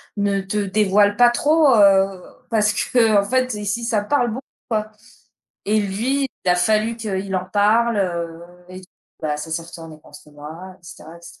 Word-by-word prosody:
ne 200 -1 0
te 195 +2 -4
dévoile 205 0 +2
pas 245 0 +6
trop, 295 +2 +3
heu, 195 -2 +4 0.3
parce 210 -1 +2 0.2
qu'en 220 -5 +4
fait, 255 +1 -1
ici, 210 +3 -3
ça 220 -3 0
parle 245 +2 +1
beaucoup», 250 +5 -5 0.3
quoi 215 -1 -2 0.8
et 215 +1 +2
lui, 240 +8 -1 0.2
il - - -1
a 180 - +3
fallu 215 +5 +1
qu'il 195 -3 -4
en 185 - -3
parle, 220 +3 +2
heu 170 -3 -3 0.3
et 185 0 -10
d - - -15 0.4
bah, 150 -1 -1
ça 155 +2 -8
s'est 165 +1 -3
retourné 165 -2 -12
contre 150 - -16
moi 160 +6 -10
et - - -26
cetera 165 -1 -12
et - - -17
cetera. - - -14
205 Hz, 185 wpm, -20 LUFS, 180-225 Hz, 0.8 s, pas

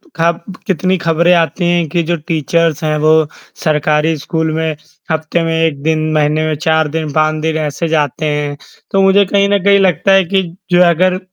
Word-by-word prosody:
खब 170 +1 0 0.3
कितनी 185 +1 0
खबरें 170 0 +2
आती 170 +1 0
हैं 175 -1 +1
कि 170 +3 0
जो 170 +2 -1
टीचर्स 165 0 0
हैं, 155 -1 0
वो 155 0 +3 0.4
सरकारी 155 +1 +1
स्कूल 160 +2 -2
में 160 -1 -2 0.4
हफ्ते 160 +2 -1
में 165 0 -1
1 160 -3 0
दिन, 155 0 0
महीने 155 +1 +1
में 155 - -1
4 160 0 +1
दिन, 155 -2 -3
5 155 0 +1
दिन 160 0 -1
ऐसे 155 +2 -3
जाते 155 -2 -1
हैं। 145 -1 -2 0.3
तो 195 - +2
मुझे 195 +1 +4
कहीं 200 +1 +1
न 200 -2 +1
कहीं 200 0 +4
लगता 190 0 +2
है 195 0 +5
कि 190 +2 0 0.3
जो 175 0 +4
है 175 - +4
अगर 185 +2 +1
160 Hz, 195 wpm, -14 LUFS, 155-175 Hz, 0.4 s, है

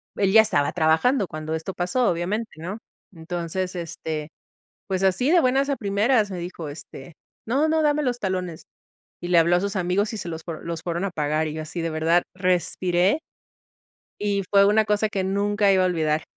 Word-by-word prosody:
él 195 -1 +1
ya 220 - +9
estaba 185 -10 +1
trabajando 180 - +2
cuando 155 0 -4
esto 160 +4 -5
pasó, 185 +8 +1
obviamente, 190 +7 -2
¿no? 180 +6 -5 0.4
Entonces, 175 +2 -4
este, 160 -3 -5 0.6
pues 190 -1 -2
así 195 - +2
de 350 0 +6
buenas 270 +1 +2
a 275 - 0
primeras, 210 +2 +1
me 185 - -5
dijo, 170 -2 -6
este: 145 +1 -10 0.3
"No, 275 +7 +2
no, 315 0 +2
dame 300 0 +2
los 250 -3 -1
talones". 185 -5 -3 0.6
Y 175 - -5
le 175 - +4
habló 170 +2 +4
a - - +1
sus 200 +1 -3
amigos, 190 +4 0
y - - -4
se 180 - -5
los 160 -1 -6
fue 165 -3 -6
los 165 -1 -5
fueron 170 +1 -2
a 200 - -1
pagar 155 -1 -1
y 155 - -4
yo 155 - -4
así, 165 +3 -6
de 165 0 -2
verdad, 165 +2 +2
respiré 180 - +1 1.0
y 200 -1 0
fue 200 -1 +5
una 215 +1 +4
cosa 210 0 +1
que 195 -3 -2
nunca 200 +1 +1
iba 190 -1 +4
a 185 - +3
olvidar. 155 -3 0
185 Hz, 200 wpm, -24 LUFS, 165-205 Hz, 1.0 s, ya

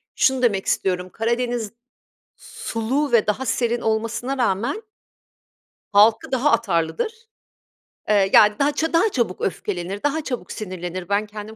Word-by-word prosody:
şunu 265 -2 +2
demek 205 -6 +1
istiyorum: 180 -1 -1
Karadeniz 235 0 -2 0.7
sulu 255 +6 -3
ve 230 -3 +4
daha 230 +5 -1
serin 240 0 0
olmasına 230 +4 -2
rağmen 240 - 0 1.1
halkı 215 +5 +4
daha 260 +3 +2
atarlıdır. 165 - 0 1.0
Eee, 200 -2 +4
yani, 210 0 +6
daha 285 +1 +3
ça 320 +3 -1
daha 365 +7 +4
çabuk 235 -8 -1
öfkelenir, 190 +1 -3
daha 290 +2 0
çabuk 250 -4 -5
sinirlenir. 185 -2 -6
Ben 205 +1 +1
kendim 210 +1 -9
220 Hz, 130 wpm, -22 LUFS, 200-255 Hz, 1.1 s, yani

